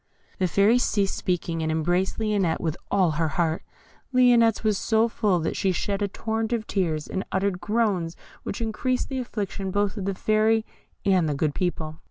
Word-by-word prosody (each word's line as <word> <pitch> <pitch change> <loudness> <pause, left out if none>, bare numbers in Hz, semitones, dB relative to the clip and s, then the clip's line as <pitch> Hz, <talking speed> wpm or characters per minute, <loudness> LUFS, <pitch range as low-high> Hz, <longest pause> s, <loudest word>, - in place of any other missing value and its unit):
The 185 - +2
Fairy 205 +7 +4
ceased 200 -5 +1
speaking, 170 -2 -2
and 160 0 0
embraced 175 +4 0
Lionette 205 -6 +1
with 160 -1 -2
all 185 -4 +3
her 160 +1 0
heart. 160 +1 0 0.5
Lionette's 240 -4 +4
was 215 -1 +2
so 225 0 +2
full 205 -5 +1
that 160 - -2
she 190 - +1
shed 200 +2 -2
a 205 - +2
torrent 220 +3 -3
of 225 -2 -1
tears, 165 -6 -1
and 190 - -3
uttered 190 -1 0
groans 205 -7 0 0.3
which 200 - -5
increased 250 +3 -1
the 265 -1 -2
affliction 200 -5 -4
both 205 +2 0
of 195 - -3
the 195 -1 -1
Fairy 220 +2 +2 0.4
and 185 -5 +3
the 145 - -1
good 150 +1 0
people. 160 -4 -3
195 Hz, 185 wpm, -25 LUFS, 170-220 Hz, 0.5 s, Fairy